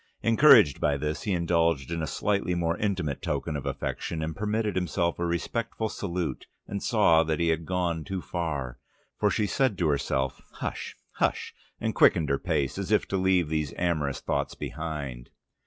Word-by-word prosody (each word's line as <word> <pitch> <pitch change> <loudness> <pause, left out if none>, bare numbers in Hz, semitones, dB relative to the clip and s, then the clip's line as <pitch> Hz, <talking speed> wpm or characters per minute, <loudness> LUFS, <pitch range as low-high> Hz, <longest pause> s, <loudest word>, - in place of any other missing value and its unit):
Encouraged 115 - +6
by 70 -1 +2
this, 75 +2 -3
he 105 - -2
indulged 85 -4 +1
in 85 -1 -2
a 80 - -2
slightly 100 +5 0
more 85 -1 0
intimate 90 -9 -1
token - - -2
of 70 - -4
affection, 80 -2 -3
and 80 0 -3
permitted 105 +1 -1
himself 90 -2 0
a 85 - 0
respectful 110 +6 -2
salute, 90 -4 -3 0.2
and 100 0 -4
saw 105 -9 +4
that 80 0 -1
he 85 -1 +2
had 80 0 -1
gone 90 -3 -1
too 95 +4 -4
far, 75 -9 -4 0.4
for - - +3
she 105 - +1
said 115 0 +1
to 85 -4 +1
herself, 65 -2 -1
"Hush, - - -5 0.2
hush!" - - 0 0.3
and - - -1
quickened 75 -4 +4
her 70 - +1
pace, 70 +6 -1
as 100 +1 -4
if 105 - +3
to - - -1
leave 95 -4 +2
these 75 -2 -2
amorous 80 -6 0
thoughts - - -2
behind. 75 -6 -5
85 Hz, 175 wpm, -27 LUFS, 75-95 Hz, 0.4 s, Encouraged